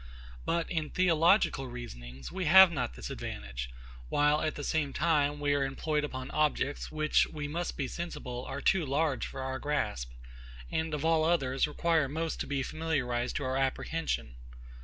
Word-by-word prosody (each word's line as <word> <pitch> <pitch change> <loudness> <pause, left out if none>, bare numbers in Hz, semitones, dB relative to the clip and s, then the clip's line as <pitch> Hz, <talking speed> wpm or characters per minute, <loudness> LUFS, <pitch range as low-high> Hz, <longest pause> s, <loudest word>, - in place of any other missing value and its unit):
But, 170 -1 0
in 160 -4 -1
theological 170 -5 +3
reasonings, 65 - -8
we 185 0 -3
have 190 +2 +9
not 125 - -2
this 60 - -6
advantage; - - -5 0.4
while, 150 +1 +3
at 155 - -1
the 145 - -5
same 145 -2 0
time, 145 -3 +2
we 145 0 +1
are 140 -1 +2
employed 150 +3 -1
upon 130 -3 -5
objects, 150 -1 0
which, 155 0 +3
we 150 -2 -5
must 170 +4 -3
be 135 - -1
sensible, 125 -7 -5
are - - -5
too 190 -3 +3
large 140 -2 0
for 135 - -7
our 130 0 -3
grasp, 100 - -1 0.6
and 160 -1 -1
of 150 +1 -3
all 165 -1 +4
others, 140 -6 +2
require 160 -1 +1
most 160 +2 -2
to - - -3
be 140 -2 -1
familiarised 130 -7 -1
to - - -1
our 130 0 -1
apprehension. 130 - -2
145 Hz, 170 wpm, -31 LUFS, 130-160 Hz, 0.6 s, have